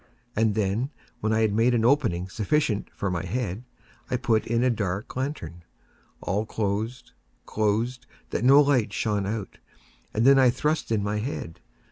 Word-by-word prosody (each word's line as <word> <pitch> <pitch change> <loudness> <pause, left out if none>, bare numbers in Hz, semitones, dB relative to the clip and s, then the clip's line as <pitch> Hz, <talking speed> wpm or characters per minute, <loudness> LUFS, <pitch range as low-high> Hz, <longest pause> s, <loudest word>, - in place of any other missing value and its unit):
And 110 -1 +2
then, 110 +5 0 0.3
when 110 - -1
I 110 0 +2
had 110 -2 +2
made 115 +3 +3
an 115 -1 +2
opening 115 -10 +2
sufficient 110 +2 0
for 100 - -3
my 90 -2 -2
head, 115 -3 -3 0.5
I 125 - +1
put 110 -2 +1
in 115 +1 +1
a 130 - +3
dark 100 -2 -3
lantern, 130 - -4 0.6
all 100 +4 -1
closed, 110 +4 -3 0.3
closed, 110 +4 -1 0.2
that - - -1
no 135 +3 +7
light 130 -8 +2
shone 105 -3 0
out, 105 -1 -5 0.5
and 110 +2 0
then 135 0 +7
I 130 -1 +6
thrust 150 +2 -1
in 105 -3 +1
my 105 +1 -1
head. 105 - -5
110 Hz, 165 wpm, -26 LUFS, 105-125 Hz, 0.6 s, no